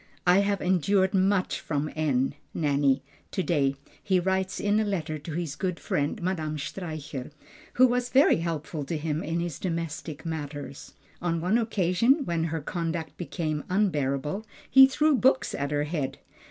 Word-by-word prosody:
"I 180 Hz, +2 st, +6 dB
have 200 Hz, -1 st, +1 dB
endured 190 Hz, +2 st, +2 dB
much 190 Hz, 0 st, +2 dB
from 150 Hz, 0 st, -2 dB
N. 140 Hz, -4 st, +1 dB, 0.2 s
(Nanny) 140 Hz, -3 st, +2 dB, 0.3 s
to 190 Hz, -, -2 dB
day," 140 Hz, -6 st, +1 dB, 0.3 s
he 190 Hz, -2 st, +2 dB
writes 190 Hz, +1 st, -1 dB
in 205 Hz, +1 st, +2 dB
a -, -, +2 dB
letter 170 Hz, -7 st, -2 dB
to 155 Hz, +2 st, -7 dB
his 160 Hz, -3 st, -3 dB
good 180 Hz, -1 st, -2 dB
friend 145 Hz, 0 st, -1 dB
Madame 160 Hz, -4 st, -1 dB
Streicher, 155 Hz, -4 st, -5 dB, 0.4 s
who 255 Hz, -, +6 dB
was 245 Hz, 0 st, +1 dB
very 270 Hz, +4 st, +5 dB
helpful 160 Hz, -2 st, -3 dB
to 160 Hz, +3 st, -2 dB
him 155 Hz, 0 st, -2 dB
in 165 Hz, +2 st, -2 dB
his 170 Hz, -4 st, -3 dB
domestic 165 Hz, -3 st, -4 dB
matters. 145 Hz, -3 st, -6 dB, 0.3 s
On 170 Hz, -1 st, 0 dB
one 185 Hz, +8 st, +2 dB
occasion, 225 Hz, -, +2 dB
when 165 Hz, -1 st, 0 dB
her 160 Hz, -1 st, -2 dB
conduct 165 Hz, 0 st, -3 dB
became 155 Hz, -4 st, -3 dB
unbearable, 150 Hz, -3 st, 0 dB, 0.2 s
he 265 Hz, 0 st, +8 dB
threw 300 Hz, +3 st, +3 dB
books 260 Hz, +1 st, +3 dB
at 140 Hz, 0 st, -2 dB
her 145 Hz, 0 st, 0 dB
head. 150 Hz, -3 st, -3 dB
170 Hz, 160 wpm, -27 LUFS, 150-190 Hz, 0.4 s, he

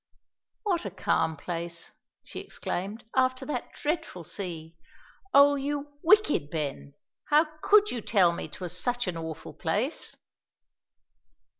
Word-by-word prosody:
"What 375 Hz, -6 st, +1 dB
a 200 Hz, -, -3 dB
calm 160 Hz, -4 st, 0 dB
place," 170 Hz, +1 st, -5 dB, 0.3 s
she -, -, -7 dB
exclaimed, 200 Hz, +6 st, -4 dB
"after 255 Hz, 0 st, +2 dB
that 260 Hz, -5 st, -3 dB
dreadful 295 Hz, -, -2 dB
sea! 165 Hz, -2 st, -6 dB, 0.6 s
O, 285 Hz, -3 st, +8 dB
you 285 Hz, +1 st, -3 dB
wicked 345 Hz, -, +4 dB
Ben, 145 Hz, -3 st, -4 dB, 0.3 s
how 300 Hz, +2 st, +5 dB, 0.2 s
could 420 Hz, 0 st, +5 dB
you 240 Hz, -, -3 dB
tell 190 Hz, -5 st, +4 dB
me 170 Hz, -, -4 dB
'twas 180 Hz, -1 st, -5 dB
such 245 Hz, +6 st, 0 dB
an 180 Hz, -, -1 dB
awful 160 Hz, -1 st, -6 dB
place?" 210 Hz, -, -2 dB
200 Hz, 125 wpm, -28 LUFS, -, 0.6 s, O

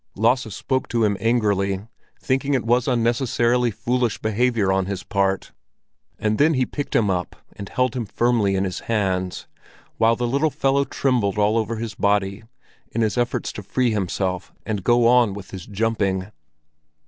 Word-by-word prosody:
Lasse 115 Hz, +2 st, +1 dB
spoke 130 Hz, -1 st, -1 dB
to 115 Hz, -1 st, 0 dB
him 105 Hz, -1 st, +2 dB
angrily, 100 Hz, -4 st, +1 dB, 0.3 s
thinking 135 Hz, +1 st, 0 dB
it 125 Hz, -, -1 dB
was 120 Hz, +1 st, +2 dB
unnecessarily 120 Hz, 0 st, +2 dB
foolish 120 Hz, +2 st, -1 dB
behavior 110 Hz, -2 st, +1 dB
on 95 Hz, -1 st, +1 dB
his 95 Hz, -2 st, -4 dB
part; 95 Hz, -2 st, -1 dB, 0.7 s
and 105 Hz, 0 st, -1 dB
then 155 Hz, +2 st, +4 dB
he 130 Hz, -1 st, +2 dB
picked 145 Hz, +2 st, -5 dB
him 105 Hz, -4 st, +3 dB
up 90 Hz, -1 st, -3 dB, 0.2 s
and 100 Hz, -, -8 dB
held 125 Hz, -1 st, 0 dB
him 120 Hz, -4 st, -3 dB
firmly 115 Hz, -4 st, +1 dB
in 95 Hz, -, +1 dB
his 95 Hz, -1 st, -3 dB
hands, 95 Hz, -4 st, -1 dB, 0.5 s
while 115 Hz, +1 st, +4 dB
the 120 Hz, -, -2 dB
little 140 Hz, +6 st, +1 dB
fellow 140 Hz, 0 st, +1 dB
trembled 120 Hz, -10 st, 0 dB
all 105 Hz, +1 st, +3 dB
over 115 Hz, 0 st, 0 dB
his 115 Hz, 0 st, -5 dB
body 100 Hz, -1 st, 0 dB, 0.5 s
in 115 Hz, -, -1 dB
his 110 Hz, -2 st, +1 dB
efforts 120 Hz, 0 st, -1 dB
to -, -, -7 dB
free 120 Hz, +5 st, 0 dB
himself 95 Hz, -3 st, -2 dB
and 105 Hz, -4 st, -3 dB
go 120 Hz, +1 st, +4 dB
on 120 Hz, -4 st, +4 dB
with 100 Hz, -2 st, -9 dB
his 95 Hz, -3 st, -8 dB
jumping. 100 Hz, -2 st, -1 dB
115 Hz, 170 wpm, -22 LUFS, 100-125 Hz, 0.7 s, then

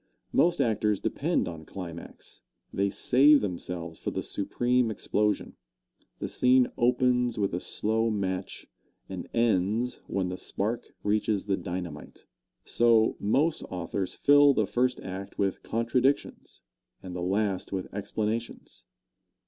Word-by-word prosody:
Most 175 Hz, 0 st, +3 dB
actors 105 Hz, -3 st, +1 dB
depend -, -, 0 dB
on 85 Hz, -2 st, -7 dB
climax 85 Hz, -1 st, -9 dB, 0.3 s
they 100 Hz, +1 st, +1 dB
save 140 Hz, +8 st, +5 dB
themselves 85 Hz, -3 st, -4 dB
for -, -, -3 dB
the -, -, -3 dB
supreme 120 Hz, +4 st, 0 dB
explosion. 105 Hz, -1 st, -1 dB, 0.6 s
The -, -, -4 dB
scene 125 Hz, 0 st, +3 dB
opens 125 Hz, 0 st, +2 dB
with 100 Hz, -3 st, 0 dB
a 90 Hz, -, -1 dB
slow 110 Hz, +4 st, 0 dB
match 95 Hz, -4 st, -3 dB, 0.4 s
and 95 Hz, -2 st, -7 dB
ends 115 Hz, +1 st, +1 dB
when 95 Hz, -2 st, -1 dB
the 90 Hz, -, -5 dB
spark 115 Hz, +4 st, -2 dB, 0.2 s
reaches 105 Hz, -1 st, 0 dB
the 100 Hz, -2 st, +1 dB
dynamite. 90 Hz, -5 st, -7 dB, 0.4 s
So, 115 Hz, -2 st, +3 dB
most 145 Hz, +10 st, +1 dB
authors 90 Hz, +1 st, -3 dB
fill 145 Hz, -1 st, +6 dB
the 110 Hz, -, +2 dB
first 125 Hz, +5 st, 0 dB
act 95 Hz, +1 st, -7 dB
with 100 Hz, -1 st, 0 dB
contradictions 125 Hz, +4 st, -1 dB, 0.4 s
and 90 Hz, -1 st, -7 dB
the 90 Hz, -, -4 dB
last 95 Hz, +1 st, -1 dB
with 95 Hz, -2 st, -2 dB
explanations. 110 Hz, +3 st, -4 dB
105 Hz, 125 wpm, -28 LUFS, 95-120 Hz, 0.6 s, fill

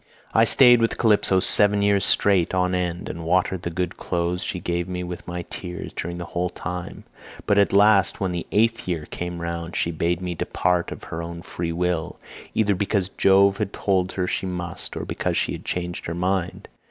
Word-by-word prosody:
"I 115 Hz, -, +5 dB
stayed 120 Hz, 0 st, +7 dB
with 115 Hz, -, +1 dB
Calypso 105 Hz, -4 st, +3 dB
seven 100 Hz, +1 st, +4 dB
years 100 Hz, -1 st, +3 dB
straight 95 Hz, -3 st, +2 dB
on 90 Hz, 0 st, +1 dB
end, 90 Hz, -1 st, -2 dB
and 85 Hz, -, -6 dB
watered 90 Hz, +2 st, +1 dB
the 85 Hz, -, -3 dB
good 90 Hz, +1 st, -3 dB
clothes 90 Hz, 0 st, -2 dB
she 90 Hz, -, -3 dB
gave 85 Hz, 0 st, -2 dB
me 90 Hz, -1 st, -4 dB
with 90 Hz, 0 st, -7 dB
my 90 Hz, 0 st, -4 dB
tears 90 Hz, -2 st, -6 dB
during 85 Hz, +1 st, -5 dB
the 85 Hz, -, -5 dB
whole 90 Hz, +1 st, -2 dB
time; 90 Hz, +1 st, -6 dB, 0.4 s
but 100 Hz, -, +3 dB
at 100 Hz, -, +3 dB
last 100 Hz, -2 st, +4 dB
when 95 Hz, -2 st, -1 dB
the 85 Hz, -1 st, -4 dB
eighth 115 Hz, 0 st, +1 dB
year 85 Hz, -4 st, -2 dB
came 90 Hz, +1 st, -6 dB
round 85 Hz, 0 st, -4 dB
she 85 Hz, -, 0 dB
bade 85 Hz, +1 st, -1 dB
me 90 Hz, -1 st, -3 dB
depart 90 Hz, +1 st, 0 dB
of -, -, -8 dB
her 80 Hz, -, -5 dB
own 85 Hz, 0 st, -7 dB
free 85 Hz, -1 st, -4 dB
will, 85 Hz, -1 st, -2 dB, 0.4 s
either 105 Hz, -2 st, +3 dB
because 100 Hz, -1 st, 0 dB
Jove 100 Hz, 0 st, +4 dB
had 105 Hz, -2 st, -3 dB
told 95 Hz, -2 st, 0 dB
her 95 Hz, -, -1 dB
she 95 Hz, -, -2 dB
must, 90 Hz, -2 st, -6 dB
or -, -, -4 dB
because -, -, -2 dB
she -, -, 0 dB
had -, -, -7 dB
changed 90 Hz, -1 st, -3 dB
her 85 Hz, -, -3 dB
mind. 90 Hz, 0 st, -2 dB
90 Hz, 200 wpm, -23 LUFS, 85-100 Hz, 0.4 s, stayed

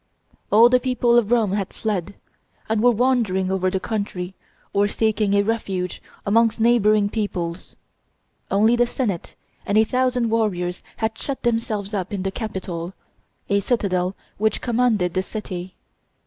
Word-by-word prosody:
All 225 Hz, +3 st, +8 dB
the 250 Hz, +1 st, +4 dB
people 250 Hz, -2 st, +2 dB
of 235 Hz, -2 st, +3 dB
Rome 225 Hz, -5 st, +3 dB
had 200 Hz, -1 st, -2 dB
fled, 205 Hz, -3 st, -2 dB, 0.5 s
and 220 Hz, -1 st, +1 dB
were 245 Hz, -, +6 dB
wandering 225 Hz, -6 st, +1 dB
over 185 Hz, -1 st, +1 dB
the 190 Hz, 0 st, -1 dB
country, 195 Hz, -4 st, -3 dB, 0.4 s
or 200 Hz, 0 st, +3 dB
seeking 215 Hz, -1 st, +1 dB
a 200 Hz, -, +4 dB
refuge 195 Hz, -5 st, -2 dB, 0.2 s
amongst 225 Hz, +2 st, +3 dB
neighboring 215 Hz, -3 st, +4 dB
peoples. 185 Hz, -5 st, -4 dB, 0.7 s
Only 215 Hz, +4 st, +4 dB
the 240 Hz, 0 st, +3 dB
senate 215 Hz, -9 st, -3 dB, 0.3 s
and 200 Hz, -, 0 dB
a 220 Hz, -, +7 dB
thousand 250 Hz, 0 st, 0 dB
warriors 180 Hz, -6 st, 0 dB, 0.2 s
had 220 Hz, 0 st, -2 dB
shut 275 Hz, -2 st, -4 dB
themselves 225 Hz, -3 st, -1 dB
up 195 Hz, 0 st, -2 dB
in 200 Hz, -2 st, -3 dB
the 195 Hz, -, -1 dB
Capitol, 190 Hz, -5 st, -5 dB, 0.5 s
a 200 Hz, 0 st, +2 dB
citadel 190 Hz, -4 st, 0 dB, 0.2 s
which 215 Hz, 0 st, +1 dB
commanded 230 Hz, -7 st, +1 dB
the 185 Hz, -, +1 dB
city. 185 Hz, -3 st, -6 dB
210 Hz, 150 wpm, -22 LUFS, 190-230 Hz, 0.7 s, All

